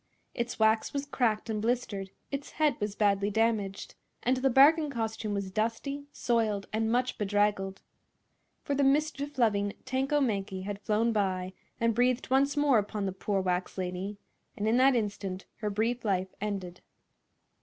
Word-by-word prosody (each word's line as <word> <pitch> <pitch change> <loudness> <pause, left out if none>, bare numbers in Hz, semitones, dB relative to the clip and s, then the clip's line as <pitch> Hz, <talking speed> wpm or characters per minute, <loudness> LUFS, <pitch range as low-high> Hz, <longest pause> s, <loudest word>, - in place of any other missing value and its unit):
Its 240 0 -3
wax 220 0 +2
was 280 0 -2
cracked 240 -6 0
and 215 -2 -2
blistered, 220 -4 -1 0.2
its 280 0 -5
head 305 -1 +2
was 210 -1 -2
badly 200 -1 +2
damaged, 210 -2 0 0.3
and 255 +2 +2
the 265 +1 +2
bargain 295 +4 +6
costume 225 -4 -3
was 195 -1 -3
dusty, 230 +7 -2
soiled 220 -6 0
and 220 +1 +1
much 250 +1 0
bedraggled. 205 -1 0 0.8
For 285 - -1
the 280 0 +2
mischief 285 0 +1
loving 205 -4 +2
Tanko 265 +3 +1
Mankie 195 -7 -1
had 200 +1 -5
flown 215 +3 +1
by 185 -3 -1 0.3
and 230 0 +2
breathed 250 +2 +1
once 275 +2 +3
more 285 -5 +4
upon 205 0 -3
the 190 - -1
poor 195 +1 -1
wax 180 0 -2
lady, 185 +2 -3 0.4
and 210 - -1
in 225 +2 +3
that 265 +1 +5
instant 200 -4 -3
her 210 -1 -2
brief 230 +4 -1
life 190 -3 0
ended. 190 -4 -4
220 Hz, 160 wpm, -29 LUFS, 200-255 Hz, 0.8 s, bargain